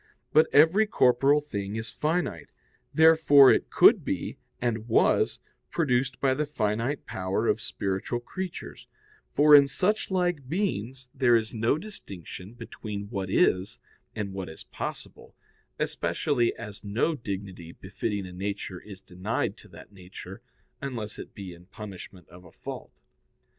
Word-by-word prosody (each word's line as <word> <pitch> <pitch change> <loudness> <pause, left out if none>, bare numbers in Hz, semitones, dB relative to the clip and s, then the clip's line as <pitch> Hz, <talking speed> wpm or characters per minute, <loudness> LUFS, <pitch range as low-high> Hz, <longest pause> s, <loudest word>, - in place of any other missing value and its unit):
But 155 - +6
every 165 +9 +5
corporeal 135 -2 +4
thing 100 -8 -5
is 110 +1 -5
finite. 150 - -2 0.4
Therefore, 160 -4 +7
it - - -1
could - - +6
be, - - -3 0.2
and 115 -2 -2
was, 115 - +3 0.3
produced 130 -5 0
by 135 -1 +2
the 150 +2 -1
finite 115 +1 -1
power 95 +4 -2
of 110 - +1
spiritual 95 +5 -3
creatures: 185 +8 -7 0.5
for 150 +1 +6
in 140 -1 +8
suchlike 180 -4 0
beings 135 - -2
there 130 -3 +4
is 110 0 0
no 115 +5 +1
distinction 100 - -9
between 100 -3 -7
what 95 -4 -3
is 95 0 +2 0.4
and 100 -3 -4
what 95 -3 -5
is 80 - -10
possible: - - -7 0.4
especially 120 -5 0
as 105 -3 -9
no 110 +10 0
dignity 95 - -6
befitting 100 +2 -4
a 90 - -9
nature 95 -1 -4
is 100 -3 -11
denied 95 +3 -3
to - - -14
that 90 +1 -14
nature, 95 +1 -11 0.4
unless 115 -6 -5
it - - -10
be 95 -3 -7
in 85 +1 -16
punishment 100 -3 -10
of 90 +2 -14
a 85 - -15
fault. - - -9
110 Hz, 140 wpm, -27 LUFS, 95-140 Hz, 0.5 s, in